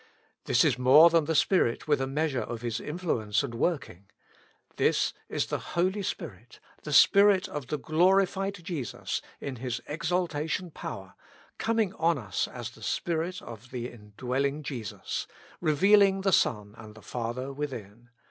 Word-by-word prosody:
This -, -, +4 dB
is -, -, +2 dB
more 145 Hz, +7 st, +7 dB
than 165 Hz, -3 st, +3 dB
tlie 160 Hz, -, 0 dB
Spirit 150 Hz, -7 st, +2 dB
with 145 Hz, -3 st, +2 dB
a 135 Hz, -, -1 dB
measure 145 Hz, -1 st, -1 dB
of 120 Hz, 0 st, -6 dB
His 115 Hz, -2 st, -2 dB
influence 150 Hz, -, -1 dB
and -, -, -5 dB
working. 115 Hz, -, -2 dB, 0.7 s
This -, -, +2 dB, 0.2 s
is -, -, 0 dB
the -, -, -3 dB, 0.2 s
Holy 185 Hz, +4 st, +1 dB
Spirit, 200 Hz, -, -6 dB, 0.2 s
the -, -, -7 dB
Spirit 200 Hz, -2 st, +6 dB
of 145 Hz, -4 st, -6 dB
the 150 Hz, -, -2 dB
glorified 190 Hz, +5 st, +2 dB
Jesus 165 Hz, -9 st, -4 dB, 0.2 s
in 135 Hz, -3 st, -5 dB
His 125 Hz, 0 st, -3 dB
exaltation 165 Hz, +1 st, -2 dB
power, -, -, -7 dB, 0.5 s
coming 225 Hz, -4 st, +1 dB
on 165 Hz, -1 st, +1 dB
us 105 Hz, -7 st, -2 dB
as -, -, -7 dB
the -, -, -17 dB
Spirit 175 Hz, +2 st, -2 dB
of 115 Hz, +1 st, -10 dB
the 125 Hz, -1 st, -5 dB
indwelling 125 Hz, +7 st, -3 dB
Jesus, 120 Hz, -8 st, -5 dB, 0.3 s
revealing 195 Hz, +5 st, +4 dB
the 195 Hz, -1 st, +1 dB
Son 105 Hz, -8 st, +1 dB
and 110 Hz, -1 st, -11 dB
the 110 Hz, -, -14 dB
Father 125 Hz, +3 st, -4 dB
within. 120 Hz, -5 st, -7 dB
145 Hz, 150 wpm, -28 LUFS, 120-175 Hz, 0.7 s, more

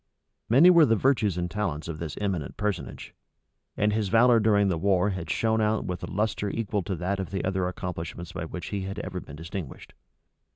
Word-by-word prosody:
Many 145 Hz, +11 st, +7 dB
were 170 Hz, -3 st, +6 dB
the 115 Hz, -, +4 dB
virtues 110 Hz, -6 st, +2 dB
and 90 Hz, -, -1 dB
talents 85 Hz, -8 st, -2 dB
of 80 Hz, -2 st, -5 dB
this 80 Hz, -4 st, -5 dB
eminent 95 Hz, -8 st, -3 dB
personage; 105 Hz, -4 st, -4 dB, 0.6 s
and 105 Hz, 0 st, +2 dB
his 105 Hz, -2 st, 0 dB
valor 115 Hz, +2 st, +5 dB
during 105 Hz, -2 st, +3 dB
the 85 Hz, -4 st, 0 dB
war 100 Hz, +1 st, +2 dB
had 90 Hz, -4 st, -5 dB
shone 110 Hz, +5 st, +1 dB
out 110 Hz, 0 st, +1 dB
with 90 Hz, -1 st, -4 dB
a -, -, -6 dB
lustre 105 Hz, 0 st, -1 dB
equal 105 Hz, -1 st, -2 dB
to 95 Hz, +1 st, -3 dB
that 95 Hz, +4 st, -2 dB
of 95 Hz, -5 st, -3 dB
the 95 Hz, +1 st, -3 dB
other 95 Hz, -1 st, 0 dB
accomplishments 85 Hz, -1 st, -5 dB
by 90 Hz, -3 st, -5 dB
which 85 Hz, 0 st, -6 dB
he 100 Hz, -1 st, -3 dB
had 95 Hz, +1 st, -5 dB
ever -, -, -4 dB
been 70 Hz, -, -11 dB
distinguished. 85 Hz, -1 st, -7 dB
95 Hz, 205 wpm, -27 LUFS, 90-105 Hz, 0.6 s, Many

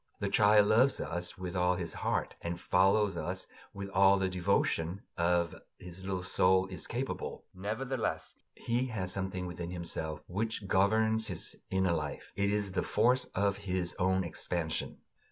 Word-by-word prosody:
The 100 Hz, -, -1 dB
child 105 Hz, +1 st, +6 dB
loves 125 Hz, +5 st, +4 dB
us 90 Hz, +1 st, -2 dB
with 90 Hz, 0 st, -5 dB
all 90 Hz, 0 st, +3 dB
his 90 Hz, -2 st, -4 dB
heart -, -, -1 dB
and 85 Hz, 0 st, -4 dB
follows 95 Hz, +2 st, +3 dB
us 90 Hz, +3 st, -3 dB, 0.3 s
with 100 Hz, 0 st, -6 dB
all 95 Hz, +1 st, +5 dB
the 95 Hz, -1 st, 0 dB
devotion 90 Hz, +1 st, 0 dB
of 85 Hz, 0 st, +2 dB
which -, -, -13 dB, 0.2 s
his 90 Hz, +1 st, -9 dB
little 95 Hz, -1 st, -2 dB
soul 95 Hz, +1 st, +3 dB
is 90 Hz, -, -5 dB
capable; 130 Hz, +3 st, -4 dB
nevertheless 110 Hz, +7 st, -3 dB, 0.2 s
he 120 Hz, +2 st, -1 dB
has 95 Hz, -6 st, -3 dB
something 95 Hz, -1 st, -3 dB
within 90 Hz, -1 st, -5 dB
himself 80 Hz, -3 st, -3 dB
which 110 Hz, +2 st, -2 dB
governs 110 Hz, +3 st, +3 dB
his -, -, -3 dB
inner 95 Hz, -2 st, +2 dB
life: 75 Hz, -3 st, -4 dB
it 100 Hz, 0 st, +1 dB
is 100 Hz, -1 st, 0 dB
the 95 Hz, -, 0 dB
force 125 Hz, +1 st, +2 dB
of 100 Hz, 0 st, +1 dB
his 95 Hz, -3 st, -2 dB
own 95 Hz, +1 st, +2 dB
expansion. 85 Hz, -1 st, -3 dB
95 Hz, 160 wpm, -32 LUFS, 90-100 Hz, 0.3 s, child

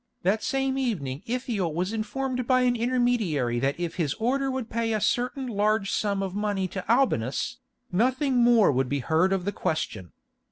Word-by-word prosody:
That 200 Hz, +5 st, +2 dB
same 270 Hz, 0 st, 0 dB
evening 155 Hz, -, -2 dB
Ithiel 225 Hz, -9 st, -2 dB
was 185 Hz, +5 st, -1 dB
informed 255 Hz, +3 st, -2 dB
by 255 Hz, -1 st, +4 dB
an 250 Hz, -1 st, +3 dB
intermediary 230 Hz, -, +1 dB
that 135 Hz, +5 st, -1 dB
if 170 Hz, -1 st, -3 dB
his 155 Hz, -6 st, 0 dB
Order 270 Hz, +4 st, 0 dB
would 260 Hz, -3 st, -3 dB
pay 230 Hz, 0 st, -1 dB
a 215 Hz, -, +1 dB
certain 250 Hz, +5 st, 0 dB
large 215 Hz, -2 st, +1 dB
sum 200 Hz, -2 st, 0 dB
of 190 Hz, -2 st, -4 dB
money 205 Hz, -2 st, -1 dB
to 190 Hz, +4 st, -3 dB
Albinus, 235 Hz, -, +1 dB, 0.3 s
nothing 255 Hz, -, +1 dB
more 235 Hz, -5 st, +5 dB
would 130 Hz, -1 st, 0 dB
be 145 Hz, -, 0 dB
heard 165 Hz, +6 st, +2 dB
of 190 Hz, -2 st, 0 dB
the 205 Hz, -, 0 dB
question. 110 Hz, -, -3 dB
215 Hz, 175 wpm, -26 LUFS, 175-245 Hz, 0.3 s, more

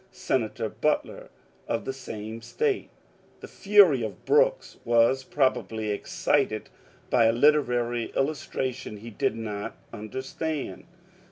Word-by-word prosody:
Senator 130 Hz, -, -1 dB
Butler, 125 Hz, +8 st, -2 dB, 0.4 s
of 115 Hz, -1 st, -2 dB
the 135 Hz, -, -2 dB
same 110 Hz, -3 st, -7 dB
State. 425 Hz, -, -1 dB, 0.5 s
The -, -, -8 dB
fury 195 Hz, -, +5 dB
of 110 Hz, -3 st, -6 dB
Brooks -, -, +2 dB
was 120 Hz, +3 st, +3 dB
probably 115 Hz, -6 st, 0 dB
excited 100 Hz, -, 0 dB, 0.4 s
by 120 Hz, -2 st, +5 dB
a 115 Hz, -, +5 dB
literary 120 Hz, -3 st, +2 dB
illustration 130 Hz, -5 st, -2 dB
he 115 Hz, +3 st, -9 dB
did 105 Hz, -, 0 dB
not 105 Hz, -2 st, -5 dB, 0.2 s
understand. 130 Hz, +7 st, -5 dB
125 Hz, 110 wpm, -27 LUFS, 115-150 Hz, 0.5 s, fury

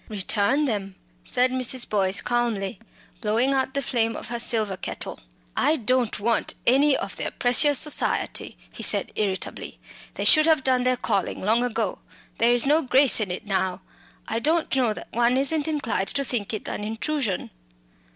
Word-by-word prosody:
"Return 215 Hz, +7 st, 0 dB
them," 200 Hz, -6 st, -3 dB, 0.3 s
said 250 Hz, 0 st, +1 dB
Mrs. 255 Hz, -1 st, 0 dB
Boyce, 195 Hz, -2 st, +1 dB
calmly, 230 Hz, -6 st, -2 dB, 0.4 s
blowing 230 Hz, +6 st, +1 dB
out 265 Hz, 0 st, -1 dB
the 280 Hz, -, -1 dB
flame 230 Hz, -3 st, 0 dB
of -, -, -7 dB
her 235 Hz, 0 st, -3 dB
silver 215 Hz, -4 st, -1 dB
kettle. -, -, -7 dB, 0.4 s
"I 310 Hz, -, +2 dB
don't 250 Hz, -4 st, 0 dB
want 230 Hz, +2 st, 0 dB
any 270 Hz, +3 st, +4 dB
of -, -, -5 dB
their -, -, -2 dB
precious 275 Hz, +4 st, +2 dB
society," 300 Hz, +2 st, -1 dB
he -, -, -10 dB
said -, -, +4 dB
irritably. 195 Hz, -3 st, -4 dB, 0.4 s
"They -, -, -3 dB
should 310 Hz, 0 st, +6 dB
have 315 Hz, -4 st, +3 dB
done 255 Hz, -1 st, +2 dB
their 255 Hz, 0 st, +2 dB
calling 195 Hz, -5 st, -1 dB
long 225 Hz, +5 st, +2 dB
ago. 225 Hz, -4 st, -2 dB, 0.4 s
There's 240 Hz, +2 st, +4 dB
no 300 Hz, +4 st, +3 dB
grace 265 Hz, -1 st, +5 dB
in 210 Hz, -4 st, -1 dB
it 180 Hz, +3 st, -5 dB
now; 190 Hz, -2 st, -1 dB, 0.5 s
I 225 Hz, -, -2 dB
don't 315 Hz, +4 st, 0 dB
know 250 Hz, -4 st, +2 dB
that -, -, -10 dB
one 240 Hz, +2 st, +2 dB
isn't 290 Hz, +3 st, 0 dB
inclined 285 Hz, -10 st, -1 dB
to 280 Hz, -1 st, -1 dB
think 235 Hz, -6 st, -3 dB
it 215 Hz, -, -5 dB
an 210 Hz, -, -5 dB
intrusion." 225 Hz, -, -2 dB
240 Hz, 170 wpm, -24 LUFS, 210-270 Hz, 0.5 s, should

